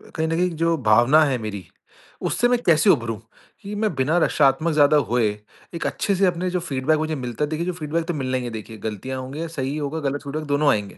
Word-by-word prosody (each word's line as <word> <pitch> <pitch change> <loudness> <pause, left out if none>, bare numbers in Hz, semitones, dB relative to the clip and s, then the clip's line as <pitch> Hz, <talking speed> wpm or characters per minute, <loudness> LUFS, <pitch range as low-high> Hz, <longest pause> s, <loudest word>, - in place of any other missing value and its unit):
कहीं 160 0 0
न - - -3
कहीं 180 +2 +1
जो 165 +1 +2
भावना 120 +9 +6
है 135 -3 0
मेरी 100 -5 -6 0.6
उससे 245 - +2
मैं 245 0 +2
कैसे 155 -2 +4
उभरूँ? 115 -5 +2 0.4
कि 205 0 -7
मैं 210 -2 0
बिना 145 +6 +1
रक्षात्मक 150 0 +2
ज़्यादा 150 0 +5
हुए 120 -2 +2 0.5
एक 165 - -4
अच्छे 200 - -1
से 195 - +3
अपने 180 0 0
जो 180 0 -1
फीडबैक 150 -1 0
मुझे 155 0 -1
मिलता 125 0 -4
है 150 - -1
देखिए 160 +2 -2
जो 180 - -2
फीडबैक 160 0 -3
तो 175 - -1
मिलना 130 -3 -1
ही 125 - -4
है 120 - -4
देखिए 110 0 -8
गलतियाँ 110 +5 -5
होंगी, 145 +6 -5
सही 140 -3 -3
होगा, 150 +1 -3
गलत 145 -1 -2
फीडबैक 150 +2 -4
दोनों 145 +1 +2
आएँगे। 105 -2 -2
150 Hz, 230 wpm, -22 LUFS, 130-165 Hz, 0.6 s, भावना